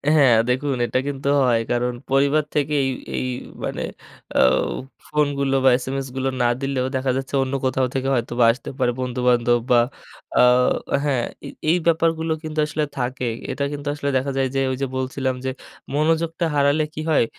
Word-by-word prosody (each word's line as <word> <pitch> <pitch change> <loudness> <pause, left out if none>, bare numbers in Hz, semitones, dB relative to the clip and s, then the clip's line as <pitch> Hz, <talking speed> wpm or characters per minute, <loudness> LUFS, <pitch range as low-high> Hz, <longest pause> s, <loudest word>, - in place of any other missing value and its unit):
হ্যাঁ, 135 -6 +6
দেখুন 135 +2 0
এটা 130 - 0
কিন্তু 140 0 -2
হয়। 120 -3 +3
কারণ 125 0 0 0.2
পরিবার 140 +3 +3
থেকে 150 0 +1
এই, - - +1 0.3
এই 130 - -1 0.4
মানে - - -3 0.6
আউ 65 +1 +4 0.4
ফোনগুলো 140 -2 +1
বা - - +8
SMS 135 0 -3
গুলো 135 0 0
না 120 - +4
দিলেও 135 -2 -1
দেখা 130 0 +1
যাচ্ছে, 135 +1 -5
অন্য 130 +1 -4
কোথাও 130 0 +1
থেকে 135 0 -1
হয়তোবা 120 0 +1
আসতে 125 - -7
পারে। 125 -1 +2
বন্ধুবান্ধব 125 -1 +2
বা 120 - +7 0.6
আ - - +7 0.6
হ্যাঁ, 130 -5 +1 0.2
এই - - -7 0.2
এই 175 - +4
ব্যাপারগুলো 165 0 +2
কিন্তু 155 0 -4
আসলে 150 0 -1
থাকে। 125 0 -2 0.2
এটা 140 - -2
কিন্তু 145 0 -6
আসলে 145 -1 -2
দেখা 140 +2 -1
যায় 135 -1 +2
যে 135 - +2
ঐ - - 0
যে 135 - +1
বলছিলাম 130 0 -1
যে, 130 - 0 0.4
মনোযোগটা 165 +2 +1
হারালে 145 +2 +3
কি 155 - -5
হয়? 150 -6 +4
135 Hz, 175 wpm, -22 LUFS, 125-145 Hz, 0.6 s, বা